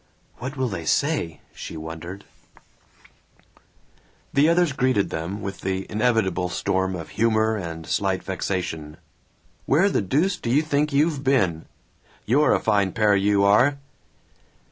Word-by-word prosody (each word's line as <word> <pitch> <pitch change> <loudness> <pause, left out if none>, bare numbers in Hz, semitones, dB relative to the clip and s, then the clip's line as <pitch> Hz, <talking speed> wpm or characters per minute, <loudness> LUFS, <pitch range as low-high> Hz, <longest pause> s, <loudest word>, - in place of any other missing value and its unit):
"What 130 +4 -6
will 130 -1 0
they 90 -7 -5
say?" 85 - 0
she - - -8
wondered. 80 +5 -8 2.1
The 145 +3 +4
others 170 -2 +3
greeted 130 -6 +1
them 85 +6 -4
with 95 -1 -6
the 95 0 -2
inevitable 105 -5 +1
storm 95 +1 -1
of 80 -3 -7
humor 110 -1 +1
and 85 -5 -6
slight 95 +1 -1
vexation: 90 -5 -4 0.7
"Where 170 +9 +4
the - - +1
deuce 155 - +1
do 115 - -5
you 145 +6 +3
think 150 0 0
you've 145 0 +1
been?" 95 - +1 0.6
"You're 145 +7 +3
a - - +1
fine 100 -2 +1
pair, 105 -3 +3
you 100 0 +2
are!" 120 +8 +4
105 Hz, 135 wpm, -23 LUFS, 95-135 Hz, 2.1 s, The